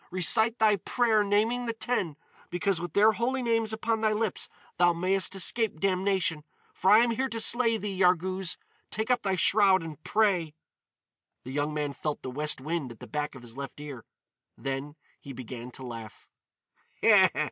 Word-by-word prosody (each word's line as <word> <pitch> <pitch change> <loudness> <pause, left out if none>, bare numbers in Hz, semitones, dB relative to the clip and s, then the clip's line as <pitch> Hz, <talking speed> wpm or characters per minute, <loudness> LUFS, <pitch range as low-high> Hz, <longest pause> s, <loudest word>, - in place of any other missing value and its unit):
"Recite 220 +6 +3
thy 215 -2 +3
prayer 220 +2 +1
naming 225 +5 0
the 230 - -1
ten, 225 -9 -2 0.3
because 175 0 -1
with 175 -2 -6
their 215 +2 +5
holy 255 +4 -2
names 225 -2 0
upon 225 0 -2
thy 215 -1 +2
lips 215 -2 -2 0.3
thou 175 -1 +5
mayest 185 +2 +1
escape 195 -1 +1
damnation. 185 -4 0 0.3
For 190 - 0
I 215 +3 +7
am 240 - +1
here 260 +4 -1
to 230 - -3
slay 230 0 +4
thee, 205 -2 -5
Yarghouz! 185 0 +1 0.3
Take 220 +3 -2
up 245 -1 +2
thy 195 -3 0
shroud 190 0 +4
and 155 -2 -9
pray!" 185 -8 +1 0.9
The 130 - -8
young 145 +2 -1
man 145 -1 -2
felt 150 +1 -4
the 130 - -5
west 150 +2 0
wind 150 -2 -4
at 115 - -13
the - - -9
back 150 -1 -4
of 125 - -12
his 115 -1 -12
left 140 +1 -8
ear. 140 -5 -8 0.5
Then 135 +2 -5 0.2
he 140 - -10
began 125 -1 -8
to 130 +1 -9
laugh. 115 -3 -10
185 Hz, 175 wpm, -28 LUFS, 150-220 Hz, 0.9 s, I